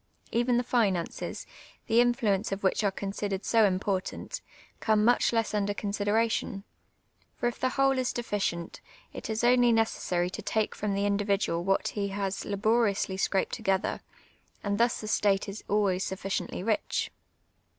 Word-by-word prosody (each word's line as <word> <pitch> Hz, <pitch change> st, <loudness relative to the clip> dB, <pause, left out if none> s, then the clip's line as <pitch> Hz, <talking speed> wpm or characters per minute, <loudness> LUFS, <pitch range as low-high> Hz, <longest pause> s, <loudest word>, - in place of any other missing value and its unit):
Even 240 Hz, +1 st, +2 dB
the 245 Hz, -, +1 dB
limmces, 205 Hz, -9 st, -1 dB, 0.4 s
the 230 Hz, +1 st, +4 dB
influence 230 Hz, -5 st, +1 dB
of 195 Hz, 0 st, -3 dB
which 190 Hz, +3 st, +2 dB
are 200 Hz, -, +3 dB
considered 195 Hz, 0 st, -4 dB
so 225 Hz, -2 st, +4 dB
important, 190 Hz, 0 st, -2 dB, 0.4 s
come 215 Hz, -1 st, +2 dB
much 245 Hz, -, +4 dB
less 225 Hz, -2 st, 0 dB
mider 205 Hz, -1 st, 0 dB
considenition; 205 Hz, 0 st, 0 dB, 0.7 s
for -, -, -3 dB
if 240 Hz, -, -1 dB
the 255 Hz, -, +1 dB
whole 270 Hz, 0 st, +2 dB
is 255 Hz, -, 0 dB
deficient, 200 Hz, -7 st, -3 dB, 0.3 s
it -, -, -7 dB
is 220 Hz, +1 st, -1 dB
only 245 Hz, 0 st, +5 dB
neces 225 Hz, -1 st, +2 dB
sar} 175 Hz, -1 st, 0 dB
to 180 Hz, -, -6 dB
take 220 Hz, -1 st, 0 dB
from 205 Hz, -1 st, -2 dB
the 200 Hz, +1 st, 0 dB
individual 200 Hz, -4 st, +1 dB
what 195 Hz, +1 st, +1 dB
he 200 Hz, -1 st, -2 dB
has 195 Hz, 0 st, -3 dB
laboriously 205 Hz, -1 st, +1 dB
scrajii'd 190 Hz, 0 st, 0 dB
together, 190 Hz, 0 st, -1 dB, 0.6 s
and 205 Hz, 0 st, -1 dB
thus 235 Hz, 0 st, +2 dB
the 215 Hz, -, -6 dB
state 205 Hz, -2 st, +2 dB
is 200 Hz, +1 st, -7 dB
always 195 Hz, -3 st, +1 dB
sufficiently 190 Hz, -1 st, -3 dB
rich. 220 Hz, 0 st, 0 dB
205 Hz, 155 wpm, -29 LUFS, 195-230 Hz, 0.7 s, only